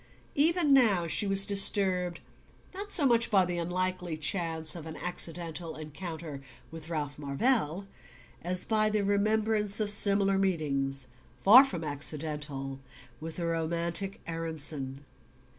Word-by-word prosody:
Even 315 0 +1
now 215 -10 +3
she 185 +5 +1
was 195 0 +4
disturbed 190 -3 +2 0.5
not 400 +2 -8
so 320 -7 +2
much 235 -2 +2
by 195 -3 +2
the 175 -1 -4
unlikely 180 -1 -4
chance 160 -1 +1
of 165 -2 -9
an 160 - -8
accidental 170 -1 -1
encounter 155 -1 -9 0.3
with 165 0 -9
Ralph 150 -3 -5
Marvell 165 - -1 0.6
as 180 +1 -3
by 215 -1 0
the 210 -1 -1
remembrance 210 +1 +1
of 210 -1 +3
similar 200 -1 +3
meetings, 140 -8 -2 0.4
far 240 +7 +8
from 180 -12 -5
accidental, 145 -2 0 0.4
with 160 +1 -7
the 170 - -4
romantic 170 +3 -3
Aaronson. 150 -4 -3
175 Hz, 125 wpm, -28 LUFS, 155-200 Hz, 0.6 s, far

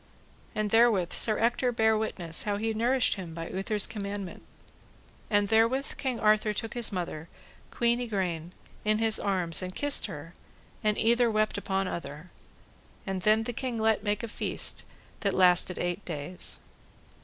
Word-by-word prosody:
And 215 -1 -1
therewith 225 -6 +4
Sir 215 -2 +2
Ector 240 +2 +1
bare 220 -1 +3
witness 180 -7 0
how 205 -1 -1
he 220 +2 -1
nourished 240 +3 +2
him 170 -4 -7
by 165 0 -6
Uther's 200 +2 +1
commandment. 200 -3 -5 0.9
And 205 -1 +2
therewith 230 +6 +2
King 260 -4 -2
Arthur 215 0 +3
took 225 +2 -3
his 240 -2 0
mother, 170 -4 -4 0.4
Queen 235 +1 +1
Igraine, 180 -7 -2 0.3
in 215 0 +2
his 220 0 +3
arms 180 -5 -1
and 185 0 -6
kissed 290 -4 +2
her, 165 -2 -9 0.5
and 210 -1 +1
either 235 +1 +3
wept 215 -1 +1
upon 195 -1 -1
other. 165 0 -7 0.7
And 190 -1 -3
then 215 +3 +3
the 240 - -4
king 245 0 -3
let 220 -1 +2
make 210 +1 -1
a - - -2
feast 220 - -1 0.3
that 200 -2 0
lasted 180 0 +4
eight 175 +3 -2
days. 165 +2 -3
210 Hz, 155 wpm, -28 LUFS, 180-225 Hz, 0.9 s, therewith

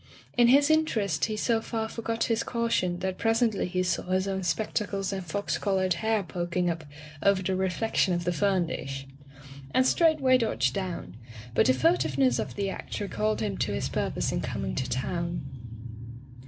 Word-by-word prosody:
In 240 -1 +5
his 285 +4 +5
interest 215 - +1
he 215 -1 -3
so 225 +1 +1
far 225 -1 -3
forgot 230 0 -2
his 230 -2 +1
caution 230 -7 0
that 190 0 -2
presently 225 -3 +2
he 185 0 0
saw 180 - 0
his 185 +1 0
own 190 -1 -1
spectacles 195 +2 -1
and 190 -1 -3
fox 200 +4 -2
colored 190 -2 +1
hair 220 +4 0
pok 175 0 -4
ing 175 -1 +2
up 165 -2 -6 0.4
over 200 -1 +3
the 190 +1 0
reflection 190 +2 +1
of 175 - -2
the 175 - 0
fern 190 -1 +2
dish, 135 -4 -5 0.7
and 260 - +5
straightway 280 -4 +4
dodged 135 - +1
down, 170 - -4 0.4
but - - +4
the 130 - +5
fur 125 -1 +4
tiveness 130 -2 +1
of - - -4
the 200 -1 -1
act 195 - -5
recalled 215 +1 -1
him 205 -3 -2
to - - 0
his 65 - -2
purpose - - -1
in - - -1
coming 65 - -3
to 130 - -2
town. 170 +5 -2
190 Hz, 180 wpm, -28 LUFS, 170-225 Hz, 0.7 s, In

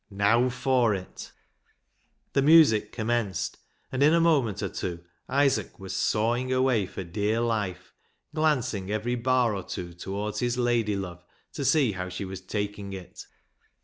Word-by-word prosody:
Now 110 +5 +3
for 125 -3 +2
it! 95 -1 -8 1.0
The 140 - +3
music 140 -9 +6
commenced, 110 -5 -2 0.3
and 130 - -2
in 150 +3 +6
a - - +4
moment 135 - +2
or 95 - -1
two 85 -1 -5 0.3
Isaac 140 0 +1
was 95 -1 -6
sawing 120 +4 +1
away 130 -6 +2
for 95 - -6
dear 105 +5 -1
life, 110 -6 -2 0.4
glancing 125 -11 0
every 110 +3 -1
bar 125 -1 +2
or 95 - -3
two 85 -1 -6
towards 100 +4 -4
his 120 0 0
lady 120 -4 +1
love 90 -3 -6 0.3
to 140 - -4
see 135 -3 +3
how 90 -1 -5
she 100 - -5
was 95 -1 -7
taking 100 +1 -4
it. 95 -2 -9
110 Hz, 150 wpm, -27 LUFS, 100-130 Hz, 1.0 s, music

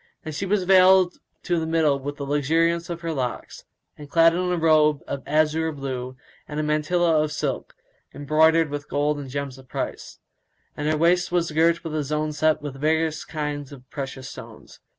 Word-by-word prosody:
And 155 - -5
she 195 +7 -3
was 200 0 +1
veiled 185 -1 +5 0.2
to 175 -1 0
the 160 - -3
middle 160 -4 +2
with 145 +2 -5
the 140 - -5
luxuriance 165 +4 +1
of 170 -1 -5
her 165 -1 -3
locks, 130 -4 -5 0.3
and 145 -1 -12
clad 165 +1 +5
in 180 +1 -1
a 180 - 0
robe 155 -2 +3
of 140 - -4
azure 155 +2 +1
blue 130 -3 -5 0.3
and 150 0 -5
a - - 0
mantilla 155 +2 +2
of 155 0 -1
silk 145 -4 -3 0.4
embroidered 155 +2 +3
with 145 0 -5
gold 145 +1 0
and 140 -2 -7
gems 140 -1 -5
of 130 - -16
price; - - -5 0.6
and 150 +1 -2
her 155 - +1
waist 175 +3 +2
was 170 -2 0
girt 165 +2 +2
with 165 -2 -5
a 155 -1 -1
zone 150 +2 -2
set 155 0 +1
with 135 -2 -7
various 160 +1 +1
kinds 150 -2 -5
of 130 -2 -13
precious 135 -2 -6
stones. - - -12
155 Hz, 190 wpm, -24 LUFS, 145-165 Hz, 0.6 s, veiled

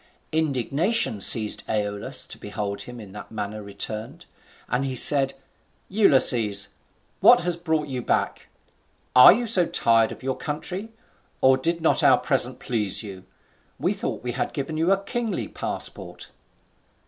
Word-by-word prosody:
Indignation 155 - 0
seized 110 +1 +2
Aeolus 105 -1 -1
to - - -7
behold 105 -1 -5
him 125 -1 -9
in 105 -3 -11
that 105 +1 -10
manner 105 0 -6
returned; 105 +2 -6 0.4
and 125 +3 -1
he 135 -1 -3
said, 135 +1 +5 0.5
"Ulysses, 130 - +4 0.5
what - - +6
has 175 0 -2
brought 160 -3 -2
you 130 -2 -4
back? - - -2 0.7
Are 125 - +10
you 240 +6 0
so 195 -6 +3
soon - - -12
tired 115 -1 +3
of - - -11
your 130 0 -2
country; 180 +8 -5 0.5
or 130 0 +4
did 165 +6 -2
not 160 - +2
our - - +5
present - - -1
please 110 -4 0
you? 95 -3 -10 0.5
We - - -1
thought - - -5
we 125 - -3
had 125 - -4
given 145 +2 -5
you 165 +4 +1
a 195 0 +1
kingly 230 +2 -3
passport." - - -6
130 Hz, 150 wpm, -23 LUFS, 110-165 Hz, 0.7 s, Are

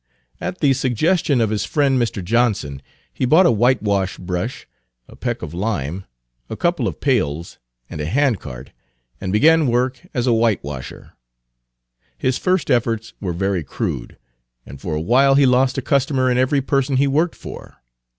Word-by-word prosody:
At 185 - -5
the 140 -3 +4
suggestion 135 - +1
of 110 -2 +1
his 105 -2 -1
friend 135 -4 +1
Mr. 110 -5 -2
Johnson, 105 - 0 0.3
he - - -4
bought 160 +9 +5
a - - +5
whitewash 105 -5 +1
brush, 90 +8 -4 0.4
a - - -14
peck 120 -4 -4
of 80 -2 -6
lime, 95 -2 -3 0.4
a - - -5
couple - - 0
of - - -5
pails, 75 +4 -1 0.3
and 75 - -6
a 75 - -3
handcart, 95 - -1 0.5
and 95 - -3
began 155 +8 +4
work 125 +2 0
as 125 -4 -1
a 125 - +3
whitewasher. 95 - -2 1.0
His 130 -1 0
first 185 -5 0
efforts 115 -2 0
were 95 -4 -2
very 95 0 -1
crude, - - -4 0.5
and 65 +1 -11
for 80 -4 -3
a - - -1
while 130 - +4
he 140 0 +5
lost 130 +1 +3
a 135 - -2
customer 135 -2 +1
in 125 - +1
every 135 +2 +2
person 135 -1 +1
he 140 - +3
worked 155 +5 +1
for. - - -10
120 Hz, 165 wpm, -20 LUFS, 95-135 Hz, 1.0 s, bought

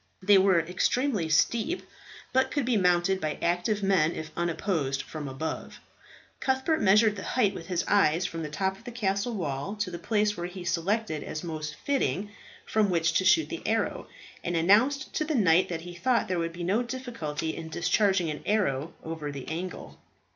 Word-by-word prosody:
They 200 0 +6
were 190 -2 +4
extremely 180 - 0
steep, 235 - +1 0.5
but 260 +1 +3
could 285 -4 -1
be 245 -1 +1
mounted 180 0 +2
by 155 -1 -2
active 180 +5 0
men 180 -4 +3
if 155 - -6
unopposed 165 -5 -1
from 155 -2 -7
above. 135 +4 -5 0.6
Cuthbert 265 +4 +1
measured 210 +2 +5
the - - -5
height 215 -6 +1
with 165 - -8
his 180 -2 0
eye 180 -6 +4
from 170 -2 -3
the 155 - -4
top 190 +5 -2
of - - -19
the 245 - -7
castle 210 0 -1
wall 150 +1 -3
to 205 -3 -3
the 170 - -6
place 210 -1 +1
which 175 -1 -5
he 185 -2 -7
selected 180 -2 -1
as 155 - -5
most 155 -3 -5
fitting 210 -7 -1 0.3
from 215 -2 +2
which 170 -1 +2
to 185 - +2
shoot 315 - +4
the - - -5
arrow, - - -1 0.4
and 175 - -2
announced 225 - +3
to 350 - 0
the 310 0 -1
knight 185 -6 +4
that 165 -2 -3
he 175 +1 -8
thought 235 +6 +1
there 185 -2 -1
would 165 0 -2
be 175 +1 -6
no 200 +7 +2
difficulty 230 - -4
in 160 -1 -7
discharging 190 0 +2
an 150 - -6
arrow 165 -9 0
over 160 -2 -5
the 140 -2 -8
angle. 175 +3 -6
185 Hz, 190 wpm, -28 LUFS, 165-215 Hz, 0.6 s, They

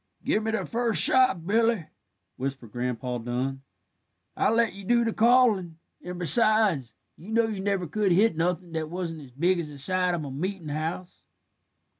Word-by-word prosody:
"Gimme 220 +1 0
the 220 - -2
first 230 -6 -1
shot, 255 -9 +3
Billy," 225 -2 +1 0.5
whispered 130 -4 -6
Grandpa 125 +1 -4
Dun. 125 +3 -4 0.7
"I - - +1
let 225 -2 +1
you 200 +1 -11
do 235 +4 +2
the 225 - -1
callin'; 220 -8 +3 0.3
and, 180 0 -7
besides, 180 - +4 0.2
you 185 - -13
know 230 +1 +2
you 215 -3 -4
never 195 -2 -1
could 195 +5 -1
hit 200 +2 +3
nothin' 175 +1 -2
that 160 -1 -4
wasn't 170 -2 -5
as 135 -3 -14
big 175 +6 +1
as 160 -3 -5
the 145 - -11
side 180 +5 +1
of 160 -3 -5
a 140 - -7
meetin' 175 +3 -5
house." 160 +4 -5
180 Hz, 170 wpm, -26 LUFS, 150-215 Hz, 0.7 s, besides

